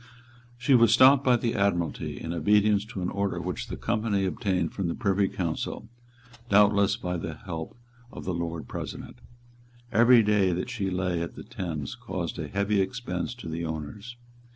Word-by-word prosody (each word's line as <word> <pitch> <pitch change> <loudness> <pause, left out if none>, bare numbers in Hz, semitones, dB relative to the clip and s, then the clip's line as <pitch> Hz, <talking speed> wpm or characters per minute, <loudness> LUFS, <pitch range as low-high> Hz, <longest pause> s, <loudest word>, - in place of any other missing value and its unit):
She 130 +3 +2
was 115 -3 +6
stopped 130 +3 +7
by 125 -2 +4
the 115 0 -1
Admiralty, 90 -5 -1
in 80 - -4
obedience 105 +4 +3
to 105 -5 -6
an 90 - -2
order 100 0 -1
which - - -4
the - - -6
Company 110 -4 0
obtained 95 -4 -1
from 95 -3 -2
the 85 - -2
Privy 100 -3 +1
Council, 90 +5 -4 0.6
doubtless 100 0 +4
by 90 -6 -3
the 80 -2 -5
help 80 +4 -7 0.3
of - - -9
the 95 - -1
Lord 85 -1 -4
President. - - -7 0.7
Every 120 +1 +6
day 100 -3 +3
that 95 +8 -3
she 100 -5 -2
lay 90 -2 -1
in 85 - -4
the - - -8
Thames 80 -7 -5
caused - - -5
a - - -3
heavy 100 +1 +1
expense 95 0 -3
to 120 -8 -10
the 80 +1 -4
owners. 80 +9 -6
100 Hz, 175 wpm, -27 LUFS, 85-110 Hz, 0.7 s, stopped